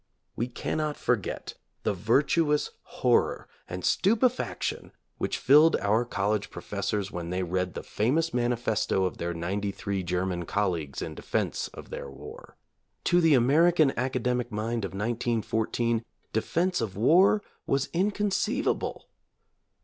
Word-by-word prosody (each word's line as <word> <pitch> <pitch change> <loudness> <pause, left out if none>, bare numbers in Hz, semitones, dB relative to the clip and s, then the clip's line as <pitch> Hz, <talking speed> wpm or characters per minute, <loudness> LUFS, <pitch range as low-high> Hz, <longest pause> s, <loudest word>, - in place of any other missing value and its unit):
We 120 - -1
cannot 150 +4 -2
forget - - -1 0.3
the - - +1
virtuous 145 - +2
horror - - +1 0.2
and 90 0 -5
stupefaction 230 +5 +1 0.3
which - - -1
filled 150 +4 +6
our 110 +4 +1
college 105 -1 -1
professors 100 0 -3
when 85 -1 -5
they 90 +1 -1
read 90 0 -2
the - - -5
famous 155 +10 0
manifesto 120 -5 +1
of 90 - -3
their 85 0 -2
ninety 100 +5 -2
three 100 0 -3
German 90 0 -2
colleagues 85 -8 -1
in - - -5
defense - - -2
of - - -12
their - - -6
war. - - -11 0.5
To 175 0 +4
the 160 -3 +5
American 155 +4 +4
academic 125 -1 -1
mind 110 +1 -2
of 95 - -6
1914 115 +1 0 0.3
defense 170 +9 0
of 100 -4 -3
war 180 - +5 0.2
was 135 0 +1
inconceivable. 200 +2 0
115 Hz, 125 wpm, -28 LUFS, 100-150 Hz, 0.5 s, filled